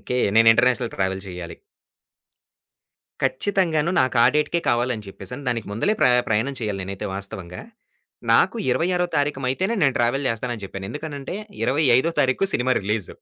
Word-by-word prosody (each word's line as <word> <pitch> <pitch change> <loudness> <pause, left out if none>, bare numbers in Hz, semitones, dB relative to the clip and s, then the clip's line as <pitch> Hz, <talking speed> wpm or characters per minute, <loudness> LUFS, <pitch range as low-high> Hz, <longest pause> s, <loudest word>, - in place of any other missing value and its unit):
Okay. 125 - -3 0.2
నేను 115 0 +6
international 120 +1 +1
travel 95 0 -1
చెయ్యాలి. 90 -2 -7 1.7
ఖచ్చితంగాను 170 -2 +1
నాకా 130 -2 +3
డేట్‌కే 150 +3 +1
కావాలి 120 +1 +1
అని 105 -2 -9
చెప్పేసని 95 +8 -8
దానికి 115 -3 -2
ముందలే 115 - +1
ప్ర - - +6 0.2
ప్రయాణం 115 +6 0
చేయాలి 105 -3 -3
నేనైతే 95 +1 -5
వాస్తవంగా, 95 -2 -7 0.7
నాకు - - +4
26 180 +5 +1
తారీకమైతేనే 145 - 0
నేను 135 -3 +3
ట్రావెల్ 130 +4 +1
జేస్తానని 115 -1 -4
జెప్పాను. 95 0 -7
ఎందుకనంటే 150 +1 -6 0.3
25 135 +2 +3
తారీఖు 130 +9 +2
సినిమా 130 +1 +2
రిలీజు. 105 -1 -2
125 Hz, 135 wpm, -23 LUFS, 105-145 Hz, 1.7 s, నేను